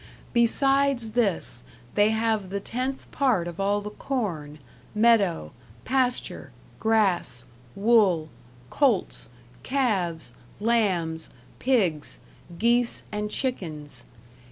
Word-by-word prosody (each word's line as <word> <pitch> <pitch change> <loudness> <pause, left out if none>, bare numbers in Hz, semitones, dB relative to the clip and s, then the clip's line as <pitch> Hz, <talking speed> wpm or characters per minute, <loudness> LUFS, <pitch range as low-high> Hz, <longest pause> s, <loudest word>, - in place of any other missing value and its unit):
Besides 270 0 +3
this, 200 - 0 0.3
they 205 +1 +4
have 220 -3 0
the 200 +1 -2
tenth 255 +6 -4
part 250 -11 +1
of 170 +1 -7
all 200 +1 +1
the 210 0 -6
corne, 175 - -3 0.4
medowe, 205 - +3 0.3
pasture, 255 -2 -1 0.3
grasse, 195 - +1 0.3
wolle, 195 -7 +3 0.4
coltes, 255 - +1 0.3
calves, 190 - -1 0.3
lambes, 185 -8 0 0.3
pigges, 190 - +1 0.4
gese 235 +3 +2
and 210 0 -3
chikens. 155 - -3
210 Hz, 90 wpm, -26 LUFS, 175-240 Hz, 0.4 s, they